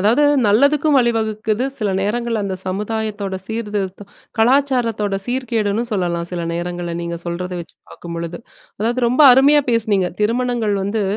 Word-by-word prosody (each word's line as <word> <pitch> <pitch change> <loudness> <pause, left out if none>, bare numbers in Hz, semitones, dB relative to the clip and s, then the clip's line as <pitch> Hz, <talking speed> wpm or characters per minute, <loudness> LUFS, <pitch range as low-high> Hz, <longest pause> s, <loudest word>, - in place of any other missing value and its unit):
அதாவது 230 +9 +3 0.2
நல்லதுக்கும் 280 +7 +3
வழிவகுக்குது, 220 -1 0
சில 215 - -1
நேரங்கள்ல 225 +1 -1
அந்த 190 -1 -2
சமுதாயத்தோட 210 0 -3
சீர்திருத்தம், 205 -3 -4 0.3
கலாச்சாரத்தோட 235 -4 +2
சீர்கேடுன்னு 230 -4 -1
சொல்லலாம். 175 -4 -1
சில 175 -1 -3
நேரங்கள்ல 175 0 -4
நீங்க 170 0 -4
சொல்றத 180 +1 -4
வச்சு 165 - -12
பார்க்கும்பொழுது. 170 0 -6 0.4
அதாவது 235 +4 0
ரொம்ப 250 +5 +1
அருமையா 285 +3 +6
பேசினீங்க. 210 -5 +1
திருமணங்கள் 230 -1 0
வந்து 205 +2 -1
215 Hz, 125 wpm, -19 LUFS, 190-235 Hz, 0.4 s, அருமையா